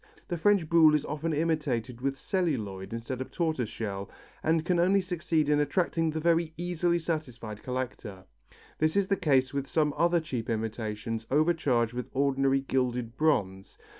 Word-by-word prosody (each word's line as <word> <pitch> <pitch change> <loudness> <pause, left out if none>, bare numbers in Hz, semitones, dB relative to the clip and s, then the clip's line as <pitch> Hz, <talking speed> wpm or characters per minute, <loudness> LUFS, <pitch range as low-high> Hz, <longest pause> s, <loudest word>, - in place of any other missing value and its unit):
The 175 - -1
French 200 -3 +3
Buhl 160 -2 +6
also - - +5
is 150 - 0
often 155 +3 -2
imitated 145 -7 -1
with 135 +1 -1
celluloid 115 - -2
instead 115 +3 -4
of 130 - -5
tortoise 155 -10 -1
shell 100 -3 -5 0.3
and 160 0 +1
can 175 -1 +2
only 190 +3 +4
succeed 170 -4 0
in 150 0 +3
attracting 165 +2 +1
the 160 0 -2
very 165 0 +2
easily 175 0 0
satisfied 125 -10 -4
collector. 120 -7 -5 0.5
This 155 0 +2
is 200 -1 +2
the 200 - +3
case 135 -7 +2
with 140 -1 -2
some 150 -1 +1
other 170 0 +3
cheap 125 -8 -4
imitations 110 0 -3
overcharged 145 -7 +2
with 125 +1 -5
ordinary 135 0 +2
gilded 125 -3 -1
bronze. 100 -12 0
145 Hz, 165 wpm, -29 LUFS, 120-165 Hz, 0.5 s, Buhl